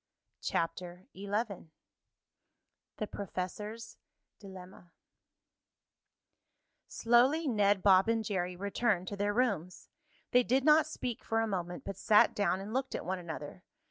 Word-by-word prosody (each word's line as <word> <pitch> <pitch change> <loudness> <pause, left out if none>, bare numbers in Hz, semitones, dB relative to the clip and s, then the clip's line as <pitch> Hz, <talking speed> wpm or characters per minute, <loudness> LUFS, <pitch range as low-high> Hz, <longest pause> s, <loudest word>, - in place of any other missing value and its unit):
CHAPTER 175 +2 -3
XI 200 -2 -4 1.3
THE 215 - -2
PROFESSOR'S 210 +3 -6 0.4
DILEMMA 185 -3 -12 2.0
Slowly 255 +7 +3
Ned, 205 -5 +2
Bob 195 +1 +5
and 225 -1 0
Jerry 180 -3 -2
returned 200 0 -1
to 205 - -5
their 205 +1 0
rooms. 200 -8 -1 0.4
They 250 - +6
did 255 +2 +1
not 310 +1 +6
speak 250 -6 -5
for 225 - 0
a 225 - +1
moment, 180 -3 -4
but 195 - -5
sat 210 +1 +4
down 200 -2 0
and 200 +3 -7
looked 265 +1 -2
at - - -5
one 185 +1 -2
another. 165 0 -8
200 Hz, 125 wpm, -32 LUFS, 185-230 Hz, 2.0 s, They